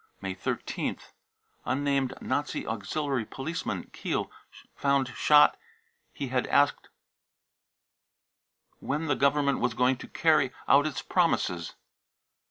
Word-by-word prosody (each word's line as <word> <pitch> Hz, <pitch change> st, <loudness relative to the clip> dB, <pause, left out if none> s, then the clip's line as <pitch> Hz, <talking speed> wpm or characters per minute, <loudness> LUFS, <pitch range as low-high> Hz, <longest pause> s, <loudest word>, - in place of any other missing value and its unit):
May 95 Hz, -1 st, -4 dB
13th. 95 Hz, -, -4 dB, 0.5 s
unnamed 135 Hz, -1 st, 0 dB
nazi 145 Hz, +3 st, -2 dB
auxiliary 125 Hz, +5 st, -2 dB
policeman, 135 Hz, +9 st, -5 dB
Kiel, -, -, -3 dB, 0.4 s
found 140 Hz, -2 st, +1 dB
sho 150 Hz, +5 st, +6 dB, 0.6 s
he 135 Hz, -, -5 dB
had 125 Hz, -1 st, 0 dB
asked 145 Hz, 0 st, +2 dB, 1.9 s
when 150 Hz, +4 st, -2 dB
the 145 Hz, -3 st, +1 dB
Government 140 Hz, 0 st, +2 dB
was 120 Hz, -2 st, 0 dB
going 125 Hz, +1 st, +2 dB
to -, -, -10 dB
carry 155 Hz, -5 st, +2 dB, 0.2 s
0 140 Hz, +3 st, +5 dB
its 155 Hz, -, -4 dB
promises. 95 Hz, -, 0 dB
140 Hz, 105 wpm, -28 LUFS, 125-145 Hz, 1.9 s, sho